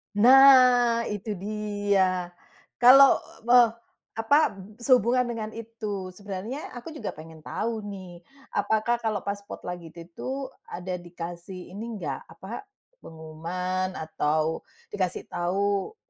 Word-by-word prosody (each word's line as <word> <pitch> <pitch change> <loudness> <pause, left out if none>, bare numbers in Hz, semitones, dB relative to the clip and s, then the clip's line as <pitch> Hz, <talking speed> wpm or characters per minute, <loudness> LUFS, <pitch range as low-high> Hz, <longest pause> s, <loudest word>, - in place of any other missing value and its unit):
Nah 250 -1 +7
itu 210 +1 -4
dia, 200 -4 -1 0.4
kalau, 265 +3 +8 0.3
eee, 240 -1 +7 0.4
apa 285 +8 +3 0.2
sehubungan 250 +1 +3
dengan 225 -2 -5
itu 215 -4 -6
sebenarnya, 200 +8 -6
aku 245 +7 -8
juga 305 - -6
pengen 160 +1 -12
tahu 220 +8 -3
nih, 185 -3 -9 0.3
apakah 220 +3 +1
kalau 215 -4 -2
pas 200 0 -3
spot 200 - -10
lagi 175 -2 -6
itu 165 +1 -11
itu 260 +10 -6 0.2
ada 180 0 -5
dikasih 175 +1 -8
ini 225 +3 -6
enggak, 145 -9 -5
apa 195 - -9 0.3
pengumuman 180 +4 -4
atau, 155 0 -1 0.3
dikasih 185 -3 -2
tahu, 195 - -1
205 Hz, 115 wpm, -26 LUFS, 180-235 Hz, 0.4 s, kalau